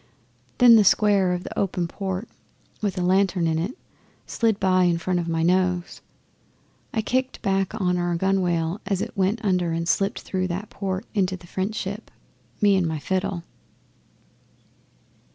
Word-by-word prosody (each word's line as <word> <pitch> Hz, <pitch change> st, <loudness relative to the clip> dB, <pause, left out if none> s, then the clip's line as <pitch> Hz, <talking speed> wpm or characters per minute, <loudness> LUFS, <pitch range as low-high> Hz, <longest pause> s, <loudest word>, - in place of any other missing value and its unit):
Then 240 Hz, -2 st, +8 dB
the 215 Hz, -, +6 dB
square 200 Hz, -2 st, +4 dB
of 180 Hz, +1 st, -3 dB
an -, -, -7 dB
open 180 Hz, -3 st, -1 dB
port, 190 Hz, +3 st, -4 dB, 0.5 s
with 200 Hz, -3 st, -2 dB
a 180 Hz, -, 0 dB
lantern 185 Hz, -1 st, +2 dB
in 160 Hz, -1 st, +1 dB
it, 190 Hz, +10 st, -3 dB, 0.5 s
slid 225 Hz, -3 st, 0 dB
by 185 Hz, -1 st, +3 dB
in 175 Hz, -1 st, +2 dB
front 180 Hz, +1 st, -1 dB
of 170 Hz, -, -3 dB
my 165 Hz, 0 st, 0 dB
nose. 180 Hz, 0 st, +1 dB, 0.9 s
I 220 Hz, -, -1 dB
kicked 255 Hz, +3 st, -1 dB
back 195 Hz, +1 st, 0 dB
on 180 Hz, -2 st, +1 dB
our 175 Hz, 0 st, 0 dB
gunwale 180 Hz, -1 st, 0 dB
as 195 Hz, -2 st, 0 dB
it -, -, -7 dB
went 200 Hz, +4 st, 0 dB
under 180 Hz, -4 st, +1 dB
and 165 Hz, 0 st, -2 dB
slipped 195 Hz, +5 st, 0 dB
through 185 Hz, -1 st, -2 dB
that 185 Hz, +4 st, -5 dB
port 195 Hz, +1 st, -3 dB
into 190 Hz, -3 st, 0 dB
the 180 Hz, -, -16 dB
French 190 Hz, +5 st, -3 dB
ship 205 Hz, +2 st, -5 dB, 0.5 s
me 205 Hz, -1 st, +5 dB
and 185 Hz, -3 st, +1 dB
my 160 Hz, -1 st, -2 dB
fiddle. 185 Hz, +2 st, -2 dB
185 Hz, 165 wpm, -24 LUFS, 175-200 Hz, 0.9 s, Then